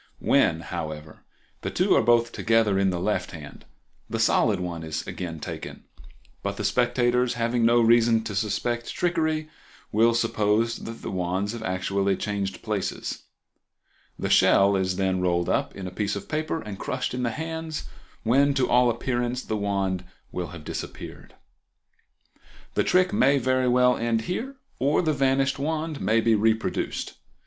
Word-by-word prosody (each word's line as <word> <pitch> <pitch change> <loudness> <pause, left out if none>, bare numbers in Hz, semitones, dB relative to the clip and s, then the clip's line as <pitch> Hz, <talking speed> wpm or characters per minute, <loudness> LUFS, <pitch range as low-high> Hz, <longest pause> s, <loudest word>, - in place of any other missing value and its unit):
When, 80 - +2
however, 80 -2 -7 0.4
the - - -3
two - - +2
are - - +5
both 120 +1 +3
together 115 -4 +2
in 95 -1 +3
the 90 -2 -2
left 90 0 -1
hand 75 -3 -10 0.4
the 115 - -2
solid 110 -2 +3
one 85 -2 -4
is 80 -1 -4
again 85 -3 -5
taken, - - -7 0.6
but 100 0 -3
the - - -3
spectators, 120 +3 +2
having 115 0 +1
no 120 +1 +5
reason 115 -1 +4
to 110 - -5
suspect 110 +4 -1
trickery, 160 -3 0 0.4
will 115 +2 +4
suppose 115 0 +1
that 115 0 -8
the - - -4
wands 95 +2 -1
have 115 -1 -6
actually 95 0 0
changed 100 -2 -3
places. 105 -4 -3 0.9
The - - -2
shell 100 +1 +5
is 95 -1 0
then 95 -1 0
rolled 85 -1 +1
up - - 0
in 95 - -6
a 90 - -5
piece 100 +2 -2
of 100 - -6
paper 155 +1 -2
and 105 -3 -7
crushed 130 -1 -3
in 125 - -2
the 120 - 0
hands, 160 +3 -4 0.4
when, 140 +4 +3
to 130 -2 +2
all 125 0 +4
appearance, 120 +1 -1
the 110 - -3
wand 100 -3 -1 0.3
will 90 -1 -3
have 80 0 -10
disappeared. - - -8 1.4
The - - +2
trick 185 +1 +3
may 140 - +4
very 130 0 +1
well 125 0 +4
end 115 -1 0
here, 235 - -4 0.2
or 140 +6 +2
the 155 -2 +1
vanished 135 0 +1
wand 155 +1 -2
may 110 +4 +2
be 115 0 +3
reproduced. 110 +1 0
115 Hz, 160 wpm, -25 LUFS, 95-125 Hz, 1.4 s, are